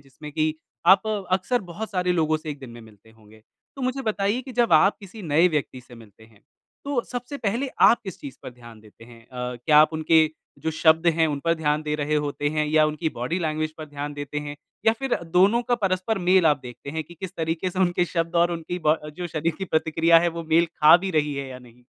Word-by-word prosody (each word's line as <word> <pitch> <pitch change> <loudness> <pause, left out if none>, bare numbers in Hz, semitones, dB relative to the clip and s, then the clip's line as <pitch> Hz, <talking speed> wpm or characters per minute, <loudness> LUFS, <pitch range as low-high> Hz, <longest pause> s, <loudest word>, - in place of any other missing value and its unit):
जिसमें 140 +2 -12
कि 155 0 0 0.3
आप 190 +1 +7 0.3
अक्सर 210 +6 +1
बहुत 215 +6 -6
सारे 180 -2 0
लोगों 155 -2 +1
से 155 0 -7
1 145 - -7
दिन 130 -3 -10
में 120 0 -11
मिलते 110 0 -18
होंगे। 110 -1 -20 0.3
तो 270 - -6
मुझे 255 +2 -2
बताइए 210 0 -1
कि 260 - -10
जब 240 -5 +1
आप 165 +6 +5
किसी 200 +2 -11
नए 160 +1 +3
व्यक्ति 145 -5 -3
से 120 - -16
मिलते 110 -1 -16
हैं, 110 -2 -23 0.4
तो 280 -3 0
सबसे 245 +3 -5
पहले 240 +4 -1
आप 235 - +6
किस 190 - -7
चीज़ 140 -2 -9
पर - - -7
ध्यान 120 -3 -15
देते 110 +1 -17
हैं? 115 -1 -15
अ, 125 0 -5
क्या 150 -1 +6
आप 155 +1 +5
उनके 160 0 +3 0.3
जो 160 - -2
शब्द 160 +1 +3
हैं, 165 -1 +3
उन 145 -2 -3
पर 165 0 +3
ध्यान 150 -1 -1
दे 150 -1 -2
रहे 150 0 -1
होते 145 0 -1
हैं, 155 0 -1
या 155 0 +3
उनकी 155 +2 -2
बॉडी 125 +9 -2
लैंग्वेज 155 -2 -2
पर 155 - -6
ध्यान 145 0 -6
देते 145 0 -5
हैं, 145 0 -7 0.3
या 225 - +6
फिर 270 -2 -1 0.2
दोनों 205 +7 +4
का 245 0 0
परस्पर 195 -1 -1
मेल 180 -1 +3
आप 150 -2 +3
देखते 125 +3 -9
हैं 160 +2 -3
कि 175 - -14
किस 185 +2 -8
तरीके 165 +3 -2
से 185 - -7
उनके 175 -1 +2
शब्द 165 -1 -3
और 170 +1 +3
उनकी 170 +1 -5
ब 155 - +6
अ, - - -7
जो 175 +4 -6
शरीर 165 0 -2
की 190 - -3
प्रतिक्रिया 165 0 +3
है, 175 - +1
वो 170 0 -5
मेल 170 +2 +4
खा 155 +2 +7
भी 190 +2 -4
रही 150 -3 0
है 140 -1 -5
या 130 - -9
नहीं? 125 -1 -19
160 Hz, 245 wpm, -24 LUFS, 145-180 Hz, 0.4 s, आप